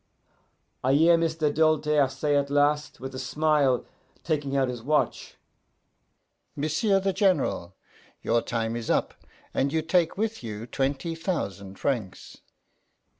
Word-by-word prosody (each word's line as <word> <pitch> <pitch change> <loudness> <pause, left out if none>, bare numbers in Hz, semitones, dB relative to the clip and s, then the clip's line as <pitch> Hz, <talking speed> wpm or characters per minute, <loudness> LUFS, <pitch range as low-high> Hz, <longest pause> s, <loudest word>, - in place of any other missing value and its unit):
I 130 +1 +3
hear 165 +3 +6
M'sieu' 160 -2 0
Doltaire 150 -2 +3
say 145 +2 -1
at 140 0 +1
last, 145 +1 +1
with 135 +1 -7
a 130 - -5
smile, 145 -1 +1 0.4
taking 145 -4 -1
out 135 -1 +2
his 125 -2 -5
watch, 150 +5 -1 1.2
'M'sieu' 160 +8 +1
the 195 0 0
General, 165 - +1 0.5
your 120 - +2
time 115 -1 -2
is 120 -1 -5
up, - - +1 0.4
and 140 +1 +1
you 160 0 0
take 170 +1 +1
with 220 +1 -2
you 110 -1 -6
twenty 135 +6 -2
thousan' 105 - -4
francs. 110 -7 -3
145 Hz, 130 wpm, -26 LUFS, 130-160 Hz, 1.2 s, hear